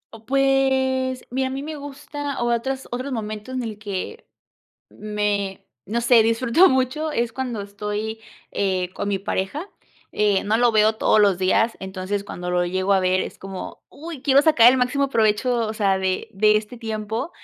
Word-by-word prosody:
O 225 0 -16
pues 265 -1 +1
mira, 260 +1 0
a - - -4
mí 270 +1 -4
me 310 +1 -5
gusta 290 0 -6
o 240 0 +2
otras 265 +3 -3
otros 255 +3 -4
momentos 215 +1 -5
en 255 - -2
el 215 -2 -6
que 210 - -6 0.6
me 210 -2 -3 0.2
no 230 +4 -2
sé, 235 -1 +5
disfruto 235 +10 +4
mucho, 260 +4 0
es 235 -4 -1
cuando 250 -5 -3
estoy, 210 +2 -5 0.3
eh, 185 -2 0
con 200 - -3
mi 200 -1 0
pareja, 200 - -3 0.4
eh, 205 -2 +2
no 210 +2 +2
lo 240 +1 +4
veo 215 0 +4
todos 215 0 +3
los 200 -3 +4
días, 190 +5 +2
entonces, 190 +1 -4
cuando 180 -3 -6
lo 180 0 +2
llego 185 +2 0
a 195 - +4
ver 185 0 +2
es - - -5
como, 195 -1 -8
uy, 315 -2 -9
quiero 280 -1 +5
sacar 245 -7 +7
el 260 - +1
máximo 275 +3 +1
provecho 225 +2 +2
o 215 - -4
sea, 200 -3 +1
de 190 -1 -2
de 210 +2 +4
este 215 +3 -4
tiempo, 220 +4 -4
225 Hz, 180 wpm, -22 LUFS, 205-260 Hz, 0.6 s, sacar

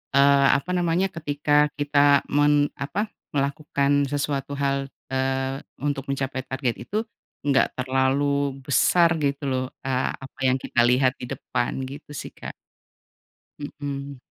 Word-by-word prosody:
eee, 140 0 +6
apa 140 +6 -8
namanya 175 +1 +2
ketika 150 -2 -3 0.3
kita 145 0 +1 0.3
men 145 +1 +4 0.3
apa, 140 - -4 0.3
melakukan 140 0 0 0.2
sesuatu 140 -1 -2
hal, 140 -1 -1 0.2
eee, 135 +1 -1 0.2
untuk 140 -2 -1
mencapai 135 -1 -2
target 130 -3 -1
itu 125 - -8 0.5
enggak 140 -2 +4
terlalu 130 +2 +1 0.4
besar 170 +5 +4
gitu 140 -1 0
loh, 130 -1 0 0.2
eee, 130 -1 0 0.2
apa 135 - -16
yang 130 0 +3
kita - - -1
lihat 130 +1 +3
di - - -4
depan 120 - -2 0.2
gitu 140 +2 -10
sih, - - -9
Kak. - - -7 1.1
Mmm. 140 -2 -6
140 Hz, 130 wpm, -24 LUFS, 130-145 Hz, 1.1 s, eee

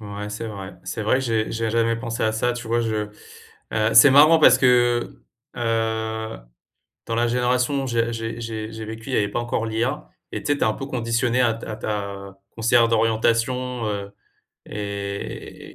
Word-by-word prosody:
Ouais, 105 0 -6
c'est 105 +2 -5
vrai 100 -2 -8
c'est 115 - -4
vrai, 120 +5 +2
j'ai 115 -4 -1
j'ai 115 0 -1
jamais 115 0 +2
pensé 115 -1 -3
à 110 - +1
ça 120 +3 0
tu 120 -1 -7
vois 115 +1 +1
je 110 -2 -2 0.6
heu, 110 +1 +1
c'est 125 +5 +9
marrant 155 +4 +7
parce - - +7
que, 120 -2 +2 0.3
heu, 110 -1 -2 0.7
dans 115 - -2
la 120 +1 +1
génération 125 +3 +1
où - - -4
j'ai 115 -1 0
j'ai 115 0 -5
j'ai 110 -1 -5
j'ai 110 0 -7
vécu, 115 +4 -8
il - - -1
y - - +2
avait 105 -1 +1
pas 100 - -3
encore 120 -1 -2
l'IA, 115 +3 -2 0.2
et - - -4
tu - - -3
sais, 145 - 0
tu - - +1
es - - +2
un 110 - +2
peu 135 - -6
conditionné 120 -1 0
à 115 -2 +2
t 115 - -9
à 110 - -5
ta 100 -2 -5 0.2
conseillère 115 +1 +4
d'orientation, 115 +2 +1
heu, 100 -1 -4 0.5
et 100 -1 -6
115 Hz, 195 wpm, -23 LUFS, 110-120 Hz, 0.7 s, c'est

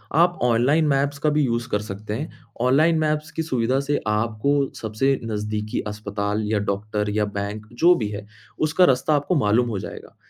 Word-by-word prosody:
आप 175 +2 +3
online 125 +7 +3
maps 140 0 +1
का 155 - +4
भी 150 0 +2
यूज़ 120 -2 -1
कर 105 - +1
सकते 105 0 -6
हैं, 145 +9 -4 0.3
ऑनलाइन 155 +6 +4
मैप्स 155 +1 -1
की 160 - -3
सुविधा 130 -3 0
से 145 +1 0
आपको 110 +5 0 0.2
सबसे 115 +5 0
नज़दीकी 105 0 -3
अस्पताल 105 0 -3
या 110 - +2
डॉक्टर 105 +1 -2
या 105 0 +1
बैंक 105 +1 -5
जो 175 +1 +7
भी 110 - -2
है 105 0 -6 0.4
उसका 180 +4 +4
रास्ता 130 +3 +2
आपको 145 +5 0
मालूम 115 +4 +2
हो 105 -4 -2
जाएगा। - - -9
115 Hz, 180 wpm, -23 LUFS, 105-145 Hz, 0.4 s, जो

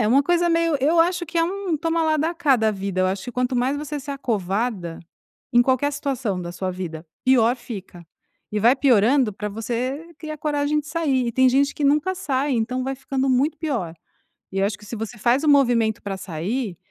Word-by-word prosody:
É! 215 - +2
Uma 275 +4 +5
coisa 345 +2 +2
meio 330 -2 +2
eu 320 +5 +4
acho 345 +1 +1
que 330 +2 -6
é - - +4
um 380 -2 -2
toma 330 +2 0
lá 315 -1 +2
dá 315 +3 0
cá 305 -5 +3
da 220 -2 +2
vida, 195 -1 -3
eu - - +3
acho 190 0 -3
que 245 - -6
quanto 250 +1 0
mais 255 +4 +1
você 295 0 -4
se 280 +1 -7
acovarda, 205 -7 -2 0.5
em 240 0 +6
qualquer 265 +3 +1
situação 255 -10 -2
da 175 -1 -6
sua 185 +1 -3
vida, 170 -3 -6 0.2
pior 245 -2 +4
fica. 195 -8 -9 0.5
E 210 - 0
vai 240 +5 +6
piorando 255 -1 +4
pra 210 +1 -5
você 245 +9 -3
criar 310 -1 -6
coragem 295 0 0
de 295 - -15
sair, 295 -6 0
e 235 - -2
tem 260 +1 +4
gente 280 +3 +2
que 290 - -2
nunca 300 +6 +2
sai, 285 -6 -1
então 250 +2 -1
vai 270 0 -2
ficando 270 0 -2
muito 275 +5 +1
pior. 235 - -2 0.6
E 195 - -2
eu - - +3
acho 200 -1 -4
que 210 - -15
se 235 - -6
você 225 +1 -6
faz 240 +6 +2
o - - +2
movimento 240 -6 +3
pra 195 -1 -4
sair 190 +4 -3
260 Hz, 220 wpm, -23 LUFS, 215-295 Hz, 0.6 s, em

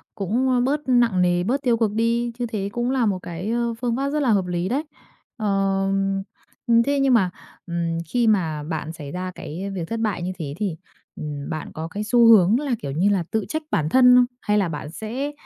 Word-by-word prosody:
cũng 245 +6 +1
bớt 285 +3 +1
nặng 240 -7 +3
nề, 175 0 +2
bớt 260 +8 0
tiêu 240 -3 +2
cực 225 -2 +1
đi, 230 +2 0
như 245 - 0
thế 200 -3 -3
cũng 240 +1 -1
là 260 -3 +2
một 195 -3 0
cái, 175 +5 -5
ờ, 235 0 0
phương 235 -2 0
pháp 275 +1 -1
rất 300 +1 -1
là 265 - +1
hợp 195 -3 +2
lý 175 +1 -2
đấy. 280 +5 0 0.5
Ờ, 195 -2 +1 1.0
thế 280 0 +1
nhưng 275 -1 +3
mà, 195 -6 +4 0.4
ừm, 170 -1 -2
khi 240 +2 +1
mà 165 -8 +1
bạn 160 0 -4
xảy 145 -3 -8
ra 185 0 -4
cái 185 +6 -6
việc 170 -3 -4
thất 230 0 -2
bại 210 -6 -1
như 180 +1 -2
thế 145 -4 -4
thì, 200 -6 -2 0.4
ừm, 145 -2 -6
bạn 155 -1 -5
có 160 +1 -5
cái 205 +5 -5
xu 235 +2 +4
hướng 220 +1 +6
là, 280 -5 -1
kiểu 140 - -4
như 175 +8 +2
là, 190 -4 +1
tự 220 -3 0
trách 315 0 -2
bản 155 0 +1
thân 250 +4 +6
không? 250 0 +6 0.2
Hay 210 0 +1
là 190 -4 +1
bạn 150 -1 -5
sẽ 245 - -4
210 Hz, 225 wpm, -23 LUFS, 175-240 Hz, 1.0 s, hướng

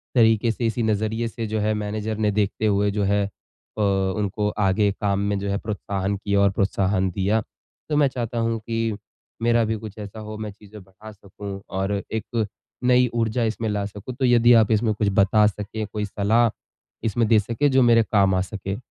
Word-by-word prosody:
तरीके 115 -1 +4
से, 115 +1 -3
इसी 115 +1 -1
नज़रिए 110 +2 0
से 115 -1 -5
जो 110 0 -2
है 105 +1 +1
मैनेजर 105 +1 -3
ने 105 -1 +1
देखते 105 +1 0
हुए 100 0 +2
जो 105 0 -1
है 100 +1 +2
अ, 105 +1 -11
उनको 100 +1 0
आगे 100 +1 +2
काम 100 -1 +1
में 100 0 0
जो 100 0 -3
है 100 - 0
प्रोत्साहन 100 -2 -3
किया 100 0 0
और 100 0 +4
प्रोत्साहन 95 -1 +1
दिया। 100 +4 +1 0.5
तो 150 - +1
मैं 145 -2 +5
चाहता 120 -2 -4
हूँ 115 0 0
कि 115 -1 -2 0.5
मेरा 120 0 +3
भी 110 +1 -1
कुछ 110 -1 -9
ऐसा 105 +1 -8
हो, 110 0 -7
मैं 105 -1 -5
चीज़ें 105 +1 -14
बढ़ा 100 +3 -13
सकूँ 100 -1 -9
और 95 +1 -1 0.2
एक 110 0 -2 0.4
नई 125 0 +4
ऊर्जा 115 +1 0
इसमें 110 0 -1
ला 100 -1 -1
सकूँ। 105 +5 -7
तो 130 -1 0
यदि 120 0 +5
आप 110 -2 +5
इसमें 110 0 +2
कुछ 105 0 -1
बता 105 +2 +4
सकें, 105 +1 -4
कोई 105 0 -3
सलाह 110 +3 +2 0.5
इसमें 115 0 +1
दे 110 -1 +5
सकें 115 +7 0
जो 130 0 +4
मेरे 115 -1 +5
काम 100 -3 +2
आ 95 - +2
सके। 100 0 -5
105 Hz, 200 wpm, -23 LUFS, 100-115 Hz, 0.5 s, मैं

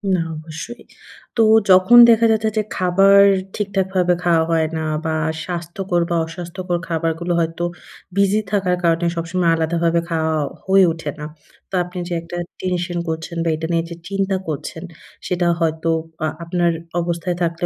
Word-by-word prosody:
না - - 0 0.2
অবশ্যই। 160 +9 -8 0.5
তো 225 - +5 0.3
যখন 185 +6 +7
দেখা 230 0 +5
যাচ্ছে 220 0 +1
যে 215 - +2
খাবার 195 +2 +4 0.4
ঠিকঠাকভাবে 190 -3 0
খাওয়া 165 -2 +3
হয়না 160 0 0 0.2
বা 160 0 0 0.3
স্বাস্থ্যকর 175 +1 -2
বা 170 - 0
অস্বাস্থ্যকর 175 +2 -4
খাবারগুলো 165 +1 -1
হয়তো 165 +1 -2 0.5
বিজি 200 +1 +3
থাকার 190 -3 +1
কারণে 170 0 +2
সবসময় 170 +1 0
আলাদাভাবে 165 +1 +1
খাওয়া 160 -1 0 0.3
হয়ে 190 -1 +5
ওঠে 160 -2 -5
না। 150 - -5 0.4
তো - - -30
আপনি 180 +1 -10
যে 175 - -4
একটা 170 +1 -8 0.2
টেনশন 180 -1 -2
করছেন 160 +1 -5
বা 165 - 0
এটা 160 +1 -4
নিয়ে 165 0 +1
যে 170 - -7
চিন্তা 195 0 0
করছেন, 160 +1 -5 0.4
সেটা 175 -1 0
হয়তো 160 0 0 0.4
আ - - +1 0.2
আপনার 170 0 +1 0.3
অবস্থায় 170 +1 -2
থাকলে 170 +1 -1
175 Hz, 150 wpm, -20 LUFS, 165-185 Hz, 0.5 s, যখন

